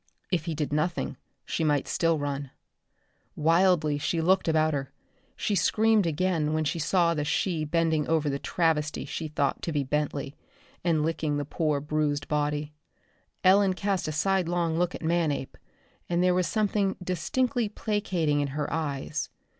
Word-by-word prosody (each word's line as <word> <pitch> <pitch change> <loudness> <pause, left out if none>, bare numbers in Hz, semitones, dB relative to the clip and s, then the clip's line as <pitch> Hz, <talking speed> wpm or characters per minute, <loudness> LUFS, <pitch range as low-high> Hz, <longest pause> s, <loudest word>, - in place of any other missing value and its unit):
If 170 -4 0
he 165 -3 -2
did 150 -1 -2
nothing 155 +4 -1 0.3
she 165 - -2
might 145 -3 +1
still 165 -1 +1
run. 140 -1 -3 0.9
Wildly 165 -2 +3
she 155 +3 -1
looked 185 +3 +2
about 155 -1 +3
her. 135 -1 -3 0.4
She 210 - -1
screamed 215 0 +3
again 160 -1 0
when 155 0 +1
she 155 +3 -1
saw 170 +1 +2
the 150 -2 -1
she 160 +1 0
bending 160 -1 +1
over 160 -2 +1
the 140 -1 -1
travesty 155 -3 0
she 160 - -4
thought 145 -2 -1
to 170 - -3
be 145 -2 0
Bentley, 145 0 -2 0.5
and 165 -3 +2
licking 155 -2 -1
the 145 - -2
poor 150 -1 0
bruised 150 0 -1
body. 150 0 -1 0.7
Ellen 190 0 +5
cast 195 0 -1
a - - -1
sidelong 175 -1 +1
look 180 0 0
at - - -8
Manape, 160 -5 0 0.5
and 175 0 +2
there 180 0 +4
was 180 -2 +1
something 205 -1 +1
distinctly 230 - 0
placating 190 -9 0
in 145 - 0
her 150 - -2
eyes. 150 -2 -2
160 Hz, 160 wpm, -27 LUFS, 150-180 Hz, 0.9 s, Ellen